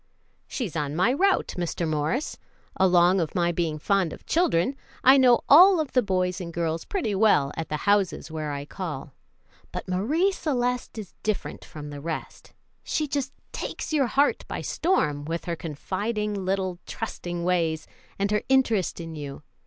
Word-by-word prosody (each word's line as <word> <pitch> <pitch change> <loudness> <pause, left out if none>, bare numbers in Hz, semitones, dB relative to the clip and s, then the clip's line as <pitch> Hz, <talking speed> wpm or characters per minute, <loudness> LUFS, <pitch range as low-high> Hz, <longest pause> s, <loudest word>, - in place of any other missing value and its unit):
"She's 220 - -4
on 145 -2 -2
my 220 +9 +3
route, 385 +6 +2
Mr. 170 -1 -2
Morris. 155 - -1 0.4
Along 180 0 +4
of 160 - -3
my 175 -1 +2
being 165 -2 -1
fond 190 +1 +1
of - - -11
children, 270 - +2 0.3
I 265 +2 +8
know 250 -3 +5
all 360 +5 +8
of 305 -3 -2
the 255 - +4
boys 185 -3 -1
and 170 -1 -6
girls 165 -1 -2
pretty 350 - -2
well 195 -9 +3
at 165 -1 -4
the 150 - -1
houses 200 -5 +1
where 155 -2 -3
I 140 0 -4
call; 150 -5 -6 0.6
but - - -5
Marie 275 - +1
Celeste 250 -9 -2
is 210 -4 -7
different 215 -2 -3
from 150 -1 -9
the 145 -1 -7
rest. 165 +1 -6 0.3
She 305 - -1
just 275 -2 -2 0.2
takes - - -5
your 280 -4 +3
heart 280 +4 +2
by - - -4
storm, 150 - 0
with 165 +3 -4
her 170 - -2
confiding, 205 +7 -3
little 190 -2 -2
trusting 175 -1 -5
ways 165 -3 0 0.3
and 200 +1 0
her 210 - +2
interest 230 -10 +2
in 165 -1 -6
you. 145 -1 -7
185 Hz, 170 wpm, -26 LUFS, 165-245 Hz, 0.6 s, I